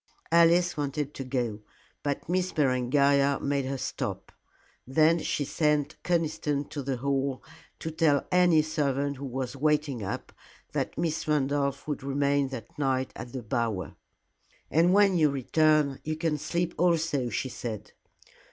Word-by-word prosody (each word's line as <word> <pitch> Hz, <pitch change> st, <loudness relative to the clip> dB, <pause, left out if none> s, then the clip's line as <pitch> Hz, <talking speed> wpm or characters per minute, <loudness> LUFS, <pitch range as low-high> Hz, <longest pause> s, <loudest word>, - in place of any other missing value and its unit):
Alice 170 Hz, +1 st, +5 dB
wanted 145 Hz, 0 st, -2 dB
to 135 Hz, -, -5 dB
go, 125 Hz, -5 st, -2 dB, 0.4 s
but 140 Hz, -1 st, -3 dB
Miss 185 Hz, +1 st, 0 dB
Berengaria 140 Hz, 0 st, +3 dB
made 140 Hz, -1 st, -1 dB
her 135 Hz, +1 st, -3 dB
stop. -, -, -4 dB, 0.6 s
Then 155 Hz, +5 st, +4 dB
she 145 Hz, -, -1 dB
sent 150 Hz, 0 st, 0 dB
Conniston 155 Hz, -4 st, -1 dB
to 145 Hz, -, -4 dB
the 135 Hz, -1 st, -2 dB
Hall 135 Hz, 0 st, -1 dB, 0.3 s
to 160 Hz, -, -5 dB
tell 155 Hz, -3 st, +2 dB
any 175 Hz, -4 st, +5 dB
servant 140 Hz, -2 st, -1 dB
who 140 Hz, -, -6 dB
was 130 Hz, +1 st, -4 dB
waiting 150 Hz, -3 st, 0 dB
up 95 Hz, -, -5 dB, 0.4 s
that -, -, -2 dB
Miss 165 Hz, -2 st, -1 dB
Randolph 140 Hz, -1 st, 0 dB
would 150 Hz, -3 st, -3 dB
remain 140 Hz, +1 st, +1 dB
that 130 Hz, 0 st, -9 dB
night 130 Hz, -2 st, 0 dB
at 120 Hz, -, -8 dB
the 130 Hz, -1 st, -6 dB
Bower. 110 Hz, -6 st, -2 dB, 0.8 s
"And 170 Hz, +3 st, +4 dB
when 195 Hz, -2 st, +4 dB
you 155 Hz, -2 st, +5 dB
return, 145 Hz, +1 st, +2 dB
you 155 Hz, 0 st, -2 dB
can 155 Hz, -1 st, -1 dB
sleep 170 Hz, +3 st, -1 dB
also," 165 Hz, -7 st, +2 dB
she 130 Hz, +3 st, -2 dB
said. 110 Hz, -4 st, -6 dB
145 Hz, 145 wpm, -28 LUFS, 135-155 Hz, 0.8 s, Alice